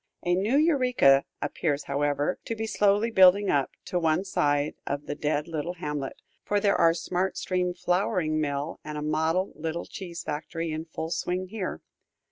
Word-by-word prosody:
A 175 - +2
new 205 +9 +2
Eureka 250 - +4 0.2
appears, 145 -3 -1
however, 145 +3 0
to 230 - -3
be 220 0 -3
slowly 210 +1 +2
building 190 0 +6
up, 140 -2 +2 0.2
to 180 - -1
one 165 +3 +1
side 145 -5 +1
of 145 +1 -3
the - - -3
dead 150 +1 -1
little 165 +2 -3
hamlet, 150 -5 -4 0.2
for 205 - +1
there 200 0 +3
are 165 0 +4
smart 180 +3 -2
steam 180 -1 -1
flouring 180 -3 0
mill 145 +1 -2
and 150 0 -6
a 150 - -3
model 160 +5 0
little 160 +2 -4
cheese 175 -3 -7
factory 160 +2 -4
in 155 +1 -4
full 160 0 -5
swing 180 +1 -2
here. 200 -3 -4
170 Hz, 170 wpm, -27 LUFS, 150-190 Hz, 0.2 s, building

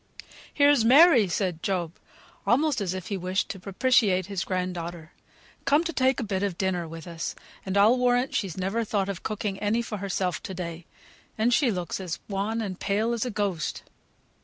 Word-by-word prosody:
"Here's 285 -4 +4
Mary," 260 - +7
said 175 -2 -2
Job, 175 -4 -1 0.5
almost 280 0 +2
as 185 -2 -2
if 185 +2 -6
he 200 - -1
wished 185 +2 -1
to 195 - -5
propitiate 195 -1 +2
his 195 -1 -3
grand 185 -1 -2
daughter, 170 -1 -7 0.5
"come 290 +4 +4
to 335 0 -3
take 260 -1 +2
a - - -1
bit 195 -3 -2
of 200 -4 -2
dinner 180 -3 -1
with 165 0 -9
us, 165 -1 -5 0.3
for 190 +1 -2
I'll 220 +5 +5
warrant 250 +1 +2
she's 190 -5 -2
never 195 +5 -1
thought 200 -2 -1
of 195 -3 -4
cooking 210 -2 -3
any 215 +3 0
for 215 -2 -5
herself 190 -2 -2
to 190 - -7
day; 170 -1 -6 0.5
and 230 +3 +2
she 265 0 +3
looks 180 -4 -3
as 175 -3 -4
wan 210 +3 -2
and 190 -4 -5
pale 215 +4 0
as 235 0 -1
a - - -2
ghost." 200 -7 -2
200 Hz, 190 wpm, -26 LUFS, 185-230 Hz, 0.5 s, Mary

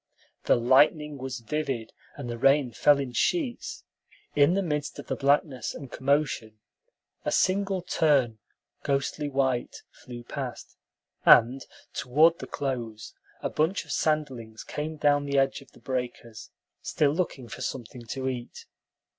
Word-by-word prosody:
The - - +5
lightning 145 +4 +3
was 130 -2 -5
vivid, 125 -2 -3 0.2
and - - -6
the 120 -1 -5
rain 135 0 +4
fell 145 +5 +4
in 135 -3 -3
sheets. 275 - -1 0.5
In 145 +5 +5
the 195 - +1
midst 150 -3 -2
of - - -8
the - - -2
blackness 140 -1 +1
and 135 -4 -9
commotion, 135 -6 0 0.7
a - - -1
single 195 -1 +1
tern, 135 -10 +2 0.4
ghostly 140 +2 -1
white, 130 -3 -1
flew 120 -1 -10
past, - - -6 0.5
and 125 +3 +6 0.3
toward 155 +6 +3
the - - -7
close 120 -6 -4 0.3
a - - 0
bunch 165 +4 0
of 145 - -9
sanderlings 135 -8 -1
came 155 +1 -5
down 145 -1 +3
the 140 0 0
edge 135 +1 +2
of 135 - -18
the - - -19
breakers, 125 -4 -5 0.3
still 145 -2 +1
looking 150 -6 -2
for 100 - -8
something 120 -1 -5
to 130 +3 -4
eat. 125 -2 -5
135 Hz, 145 wpm, -27 LUFS, 125-150 Hz, 0.7 s, and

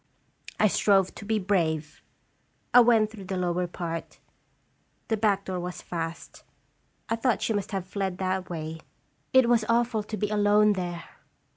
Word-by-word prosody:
I 215 - +5
strove 195 -1 +3
to 205 - -10
be 220 +1 +1
brave. 165 -6 -1 0.7
I 245 - +9
went 225 -3 +4
through 205 -4 -10
the 190 0 -3
lower 180 0 0
part. 170 -1 -6 0.9
The 225 - +2
back 205 -2 +1
door 185 -1 -3
was 180 0 -6
fast. 165 -1 -6 0.6
I 225 - 0
thought 235 +1 0
she 225 - 0
must 205 -1 -2
have 190 -3 -3
fled 190 -1 -3
that 185 0 -2
way. 160 -1 -5 0.5
It 260 -2 +5
was 235 -2 +3
awful 230 -1 +2
to 215 +1 -6
be 210 -1 -1
alone 210 0 +4
there 175 -3 -4
195 Hz, 160 wpm, -27 LUFS, 180-215 Hz, 0.9 s, I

